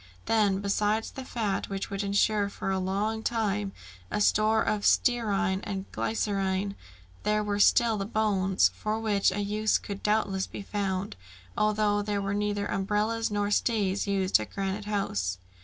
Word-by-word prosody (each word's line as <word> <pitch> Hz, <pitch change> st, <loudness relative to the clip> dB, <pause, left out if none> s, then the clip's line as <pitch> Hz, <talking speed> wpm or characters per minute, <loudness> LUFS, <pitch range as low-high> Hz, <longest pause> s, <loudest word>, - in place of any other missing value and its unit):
Then, 205 Hz, -3 st, +2 dB
besides 210 Hz, +2 st, 0 dB
the 265 Hz, -, -7 dB
fat, 220 Hz, -6 st, -2 dB
which 195 Hz, 0 st, -4 dB
would 195 Hz, 0 st, -2 dB
insure 205 Hz, +1 st, +2 dB
for 195 Hz, -, -4 dB
a 190 Hz, -, 0 dB
long 205 Hz, +4 st, -1 dB
time 210 Hz, -3 st, -1 dB, 0.4 s
a -, -, -1 dB
store 215 Hz, +1 st, +3 dB
of 210 Hz, -1 st, -1 dB
stearine 215 Hz, -5 st, +2 dB
and 195 Hz, -1 st, -4 dB
glycerine, 195 Hz, -2 st, -1 dB, 0.5 s
there 210 Hz, 0 st, +1 dB
were 205 Hz, -1 st, -1 dB
still 225 Hz, +1 st, +4 dB
the 195 Hz, -, -2 dB
bones, 195 Hz, -4 st, +2 dB
for 215 Hz, +1 st, -2 dB
which 210 Hz, -3 st, +2 dB
a 205 Hz, -, -2 dB
use 210 Hz, +1 st, +1 dB
could 200 Hz, -1 st, -7 dB
doubtless 205 Hz, -3 st, 0 dB
be -, -, -7 dB
found, 195 Hz, -1 st, -2 dB, 0.4 s
although 210 Hz, -1 st, +2 dB
there 205 Hz, 0 st, -1 dB
were 195 Hz, 0 st, -2 dB
neither 205 Hz, 0 st, -1 dB
umbrellas 210 Hz, +4 st, 0 dB
nor 205 Hz, 0 st, -1 dB
stays 205 Hz, -3 st, +1 dB
used 195 Hz, -, +2 dB
at 110 Hz, -, -5 dB
Granite 195 Hz, +1 st, -3 dB
House. 100 Hz, -, -1 dB
205 Hz, 155 wpm, -28 LUFS, 195-215 Hz, 0.5 s, still